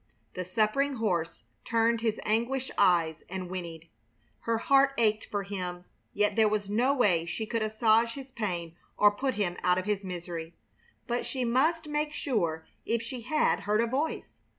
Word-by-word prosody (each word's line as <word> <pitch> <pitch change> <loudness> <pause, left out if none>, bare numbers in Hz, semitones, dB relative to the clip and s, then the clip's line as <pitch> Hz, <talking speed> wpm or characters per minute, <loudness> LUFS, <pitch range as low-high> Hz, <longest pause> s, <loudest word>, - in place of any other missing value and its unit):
The 185 - -3
suffering 220 +9 +1
horse 180 -8 -1 0.2
turned 230 0 +2
his 225 -2 0
anguished 240 +5 0
eyes 165 -3 +3
and 185 -1 -5
whinnied. 170 -3 -6 0.5
Her 230 0 0
heart 275 +3 +4
ached 215 -2 +2
for 205 -3 -2
him, 180 -3 -5 0.3
yet 210 0 +1
there 220 -1 +5
was 205 -1 -2
no 245 +6 +3
way 195 -11 +2
she 220 +6 -3
could 230 +1 -2
assuage 220 +1 +3
his 270 -1 -9
pain 175 -8 -3 0.2
or 210 0 +6
put 260 +5 -2
him 185 -4 -1
out 180 0 +3
of 185 - -2
his 205 -1 -1
misery. 175 -2 -6 0.5
But 240 -1 -2
she 255 -2 -2
must 305 +7 +2
make 300 0 -1
sure 170 - -1 0.2
if 230 0 -1
she 240 +1 -6
had 305 +7 +1
heard 210 +1 0
a 230 - +3
voice. 270 +7 -2
215 Hz, 175 wpm, -29 LUFS, 180-245 Hz, 0.5 s, or